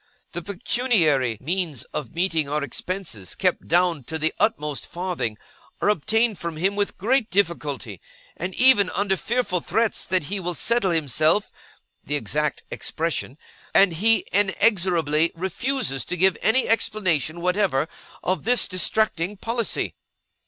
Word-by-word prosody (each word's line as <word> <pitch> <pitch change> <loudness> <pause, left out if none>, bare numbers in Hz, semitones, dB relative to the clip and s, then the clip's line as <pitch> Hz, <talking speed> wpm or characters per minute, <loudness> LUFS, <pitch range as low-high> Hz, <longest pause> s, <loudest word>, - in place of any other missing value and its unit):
The 175 - -5
pecuniary 175 - +1
means 165 -3 -1
of 140 -7 -4
meeting 165 -4 0
our 150 0 -1
expenses, 145 - -5
kept - - 0
down 170 -3 +2
to 160 - -4
the 160 +1 0
utmost 150 - 0
farthing, 175 -11 -3 0.4
are - - +2
obtained 215 +2 +1
from 170 -2 -4
him 190 +5 0
with 205 0 -1
great 235 +3 +1
difficulty, 150 - -1 0.3
and 180 +2 -5
even 245 -7 +5
under 200 -1 +1
fearful 205 -3 -1
threats 225 +4 0
that 185 -3 +1
he 195 +7 -3
will 175 -1 -2
Settle 235 -1 +2
himself 160 - +1 0.5
(the 145 - -2
exact 150 -1 -1
expression); 160 -4 -3 0.4
and 195 -3 +6
he 220 +7 +2
inexorably 180 -6 +3
refuses 190 - 0
to 180 - -3
give 185 +1 +4
any 250 +4 +3
explanation 185 -8 0
whatever 180 -5 +1 0.4
of 185 -4 -1
this 245 +2 +3
distracting 185 0 0
policy. 230 +2 -1
180 Hz, 135 wpm, -23 LUFS, 155-205 Hz, 0.5 s, and